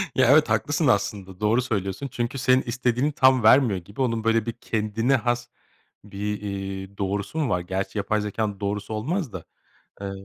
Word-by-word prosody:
Ya, 130 Hz, -1 st, +4 dB
evet, 150 Hz, +1 st, +5 dB
haklısın 145 Hz, +1 st, +1 dB
aslında, 100 Hz, -4 st, 0 dB
doğru 110 Hz, +4 st, +2 dB
söylüyorsun 105 Hz, +1 st, -3 dB
çünkü 120 Hz, 0 st, -3 dB
senin 130 Hz, 0 st, +3 dB
istediğini 125 Hz, +3 st, 0 dB
tam 130 Hz, -4 st, +4 dB
vermiyor 110 Hz, -4 st, +5 dB
gibi. 100 Hz, +9 st, -8 dB
Onun, 115 Hz, -3 st, 0 dB
böyle, 115 Hz, -1 st, +2 dB
bir 115 Hz, -, -2 dB
kendine 115 Hz, +3 st, 0 dB
has 120 Hz, +1 st, -1 dB, 0.6 s
bir, 105 Hz, 0 st, -4 dB
iii, 95 Hz, -1 st, -5 dB
doğrusu 100 Hz, +8 st, -3 dB
mu 145 Hz, -5 st, 0 dB
var? 90 Hz, -, +1 dB
Gerçi 95 Hz, +4 st, -4 dB
yapay 105 Hz, +1 st, 0 dB
zekânın 105 Hz, -1 st, -3 dB
doğrusu 105 Hz, +1 st, -3 dB
olmaz 140 Hz, -, -2 dB
da. 90 Hz, -, -7 dB, 0.6 s
Eee, 100 Hz, -1 st, -4 dB
110 Hz, 170 wpm, -24 LUFS, 100-130 Hz, 0.6 s, evet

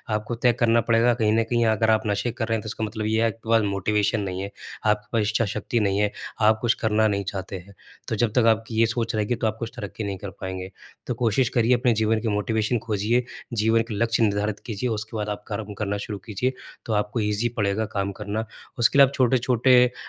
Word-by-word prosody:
आपको 110 Hz, +3 st, -3 dB
तय 120 Hz, +1 st, +3 dB
करना 115 Hz, 0 st, +4 dB
पड़ेगा। 115 Hz, +1 st, +4 dB
कहीं 110 Hz, -3 st, +1 dB
न 115 Hz, -, +3 dB
कहीं 120 Hz, -1 st, +2 dB
अगर 110 Hz, 0 st, +2 dB
आप 110 Hz, -, +3 dB
नशे 105 Hz, +3 st, 0 dB
कर 115 Hz, 0 st, -3 dB
रहे 115 Hz, -, +1 dB
हैं, 110 Hz, -, -2 dB
तो -, -, -7 dB
इसका 110 Hz, +1 st, -4 dB
मतलब 110 Hz, 0 st, -3 dB
ये 110 Hz, +1 st, +1 dB
है, 115 Hz, -, +4 dB
आपके 115 Hz, 0 st, -6 dB
पास 115 Hz, -1 st, +5 dB
मोटिवेशन 105 Hz, +2 st, +1 dB
नहीं 95 Hz, -1 st, -3 dB
है, 100 Hz, -, -4 dB, 0.4 s
आपके 105 Hz, 0 st, +1 dB
पास 110 Hz, -, +3 dB
इच्छा 115 Hz, +1 st, +1 dB
शक्ति 120 Hz, -, -1 dB
नहीं 100 Hz, -1 st, +1 dB
है, 105 Hz, 0 st, +2 dB, 0.3 s
आप 110 Hz, 0 st, +5 dB
कुछ 115 Hz, -2 st, +3 dB
करना 110 Hz, 0 st, +3 dB
नहीं 100 Hz, -1 st, -1 dB
चाहते 95 Hz, 0 st, -5 dB
हैं। 100 Hz, -, -15 dB, 0.3 s
तो -, -, -1 dB
जब 110 Hz, +1 st, +1 dB
तक 115 Hz, -, +3 dB
आपकी 110 Hz, +1 st, -9 dB
ये 115 Hz, -, +6 dB
सोच 115 Hz, 0 st, -2 dB
रहेगी, 110 Hz, +3 st, 0 dB
तो 115 Hz, -1 st, -1 dB
आप 110 Hz, +1 st, -2 dB
कुछ 115 Hz, -1 st, -4 dB
तरक्की 105 Hz, +2 st, -6 dB
नहीं 100 Hz, -2 st, -3 dB
कर 100 Hz, +2 st, -7 dB
पाएँगे। 95 Hz, 0 st, -5 dB, 0.4 s
तो -, -, 0 dB
कोशिश 115 Hz, +2 st, +2 dB
करिए, 120 Hz, +2 st, +4 dB
अपने 125 Hz, -1 st, +2 dB
जीवन 110 Hz, 0 st, +2 dB
की 115 Hz, -, -2 dB
मोटिवेशन 110 Hz, +2 st, 0 dB
खोजिए, 110 Hz, +4 st, +1 dB, 0.3 s
जीवन 110 Hz, 0 st, +3 dB
के -, -, -1 dB
लक्ष्य 115 Hz, +2 st, +1 dB
निर्धारित 105 Hz, 0 st, 0 dB
कीजिए। 115 Hz, +1 st, -2 dB
उसके 110 Hz, 0 st, -4 dB
बाद 105 Hz, 0 st, -2 dB
आप 105 Hz, 0 st, -4 dB
कर्म 105 Hz, -1 st, -5 dB
करना 100 Hz, -1 st, -2 dB
शुरू 105 Hz, -, -4 dB
कीजिए, 125 Hz, +4 st, -1 dB, 0.3 s
तो 110 Hz, -, -2 dB
आपको 105 Hz, +2 st, 0 dB
ईज़ी 105 Hz, +3 st, 0 dB
पड़ेगा 100 Hz, +2 st, +1 dB
काम 100 Hz, 0 st, 0 dB
करना। 105 Hz, +2 st, -2 dB, 0.3 s
उसके 120 Hz, +4 st, +4 dB
लिए 140 Hz, -, +10 dB
आप 140 Hz, -, -9 dB
छोटे-छोटे 125 Hz, 0 st, +4 dB
अ, 125 Hz, -, -12 dB
110 Hz, 240 wpm, -24 LUFS, 105-115 Hz, 0.4 s, लिए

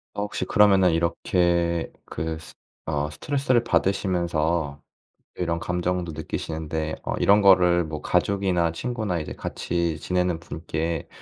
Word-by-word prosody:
어 105 Hz, -, -2 dB
혹시 105 Hz, -, -3 dB
그러면은 95 Hz, -3 st, +5 dB
이렇게 85 Hz, 0 st, +1 dB
그 80 Hz, 0 st, -4 dB
스 80 Hz, -, -12 dB, 0.3 s
어 75 Hz, -1 st, -1 dB
스트레스를 130 Hz, -, 0 dB
받으시면서 85 Hz, -7 st, 0 dB, 0.5 s
이런 85 Hz, -2 st, -1 dB
감정도 90 Hz, 0 st, -2 dB
느끼시는데 80 Hz, 0 st, -4 dB
어 -, -, -3 dB
이런 105 Hz, +1 st, +5 dB
거를 90 Hz, -3 st, +6 dB
뭐 75 Hz, -1 st, -5 dB
가족이나 95 Hz, -4 st, +1 dB
친구나 110 Hz, 0 st, -2 dB
이제 75 Hz, -, -5 dB
같이 85 Hz, -2 st, -2 dB
지내는 90 Hz, 0 st, 0 dB
분께 80 Hz, +1 st, -4 dB
85 Hz, 295 characters per minute, -25 LUFS, 80-95 Hz, 0.5 s, 거를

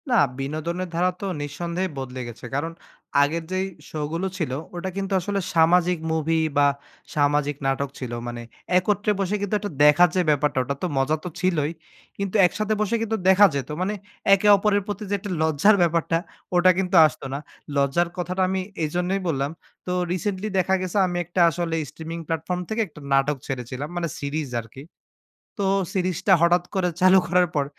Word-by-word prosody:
না, 245 Hz, -, +3 dB, 0.2 s
বিনোদনের 160 Hz, +6 st, -3 dB
ধারা 180 Hz, +2 st, +2 dB
তো -, -, -3 dB, 0.2 s
নিঃসন্দেহে 170 Hz, +6 st, -3 dB
বদলে 130 Hz, -1 st, -5 dB
গেছে। 120 Hz, +1 st, -10 dB
কারণ 155 Hz, +4 st, -1 dB, 0.5 s
আগের 160 Hz, +4 st, +1 dB
যেই 185 Hz, 0 st, 0 dB, 0.2 s
শো 155 Hz, -, -5 dB
গুলো 175 Hz, +3 st, -1 dB
ছিল 160 Hz, -8 st, -2 dB, 0.2 s
ওটা 175 Hz, +2 st, -3 dB
কিন্তু 195 Hz, 0 st, -2 dB
আসলে 200 Hz, +2 st, -2 dB, 0.2 s
সামাজিক 175 Hz, +1 st, +4 dB
মুভি 160 Hz, 0 st, +1 dB, 0.2 s
বা 145 Hz, 0 st, +6 dB, 0.5 s
সামাজিক 145 Hz, 0 st, +2 dB
নাটক 135 Hz, +1 st, 0 dB
ছিল। 125 Hz, -3 st, -5 dB, 0.2 s
মানে 120 Hz, 0 st, -5 dB, 0.4 s
একত্রে 205 Hz, +3 st, +1 dB
বসে 195 Hz, +1 st, 0 dB
কিন্তু 205 Hz, +1 st, -1 dB
একটা 205 Hz, -1 st, -5 dB
দেখার 150 Hz, +4 st, +7 dB
যে 185 Hz, -, +3 dB
ব্যাপারটা 150 Hz, -1 st, +1 dB
ওটা 140 Hz, +3 st, -3 dB
তো -, -, +2 dB
মজা 135 Hz, +4 st, +2 dB
তো 180 Hz, -, -4 dB
ছিলই। 170 Hz, -5 st, +1 dB, 0.5 s
কিন্তু 200 Hz, 0 st, -3 dB
একসাথে 215 Hz, +4 st, 0 dB
বসে 215 Hz, +2 st, +1 dB
কিন্তু 225 Hz, 0 st, -1 dB
দেখা 190 Hz, +2 st, +7 dB
যেত। 140 Hz, +1 st, -3 dB
মানে 195 Hz, +3 st, 0 dB, 0.4 s
একে 195 Hz, +1 st, +3 dB
অপরের 205 Hz, 0 st, +2 dB
প্রতি 205 Hz, +1 st, -4 dB
যে -, -, -1 dB
একটা 200 Hz, +1 st, -6 dB
লজ্জার 160 Hz, +7 st, +4 dB
ব্যাপারটা 165 Hz, -1 st, +2 dB, 0.4 s
ওটা 180 Hz, +1 st, +6 dB
কিন্তু 190 Hz, 0 st, 0 dB
আসত 155 Hz, -, -2 dB
না। 140 Hz, -, -2 dB, 0.4 s
লজ্জার 140 Hz, +5 st, +2 dB
কথাটা 180 Hz, +1 st, -2 dB
আমি 190 Hz, 0 st, 0 dB, 0.2 s
এইজন্যই 180 Hz, +5 st, -1 dB
বললাম। 140 Hz, -3 st, -1 dB, 0.3 s
তো 180 Hz, -, -3 dB, 0.2 s
রিসেন্টলি 190 Hz, +2 st, -2 dB
দেখা 185 Hz, +1 st, +1 dB
গেছে 185 Hz, +1 st, -3 dB
আমি 175 Hz, -1 st, -3 dB, 0.3 s
আসলে 165 Hz, 0 st, -2 dB
স্ট্রিমিং 165 Hz, +1 st, -7 dB
প্ল্যাটফর্ম 165 Hz, +2 st, -2 dB
থেকে 220 Hz, +1 st, 0 dB
একটা 150 Hz, -, -15 dB
নাটক 135 Hz, +1 st, +2 dB
ছেড়েছিলাম। 130 Hz, +1 st, -4 dB
মানে 175 Hz, -1 st, -1 dB
সিরিজ 145 Hz, 0 st, -3 dB
আরকি। 115 Hz, +4 st, -12 dB, 0.8 s
তো 200 Hz, -, 0 dB, 0.3 s
সিরিজটা 185 Hz, 0 st, 0 dB
হঠাৎ 175 Hz, +1 st, +4 dB
করে 185 Hz, -2 st, +1 dB
চালু 185 Hz, +1 st, +7 dB
করার 175 Hz, 0 st, +3 dB
পর 145 Hz, -2 st, +2 dB
175 Hz, 175 wpm, -24 LUFS, 145-185 Hz, 0.8 s, দেখার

